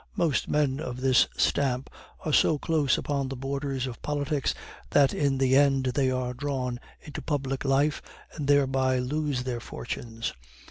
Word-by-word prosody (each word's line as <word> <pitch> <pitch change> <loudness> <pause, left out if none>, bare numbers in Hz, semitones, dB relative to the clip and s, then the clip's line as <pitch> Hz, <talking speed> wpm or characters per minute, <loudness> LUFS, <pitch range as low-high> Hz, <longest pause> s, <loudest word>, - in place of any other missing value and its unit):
Most 165 -6 +1
men 145 -2 +1
of 125 -5 -5
this 130 -1 +4
stamp 135 -2 +1 0.4
are 155 - -1
so 155 - +4
close 150 -3 +1
upon 140 -2 -2
the 135 - -4
borders 135 0 -3
of 125 -3 -7
politics, 145 -1 -1 0.3
that 140 -2 +4
in 140 -2 +1
the 130 0 +3
end 135 -1 +4
they 135 -1 +2
are 130 -1 -1
drawn 130 -2 -3 0.2
into 150 - -7
public 135 -3 -2
life, 140 +2 +2 0.3
and 145 -4 -4
thereby 135 -2 +3
lose 140 0 -1
their 125 -2 -3
fortunes. 115 0 -5
135 Hz, 155 wpm, -27 LUFS, 130-145 Hz, 0.4 s, this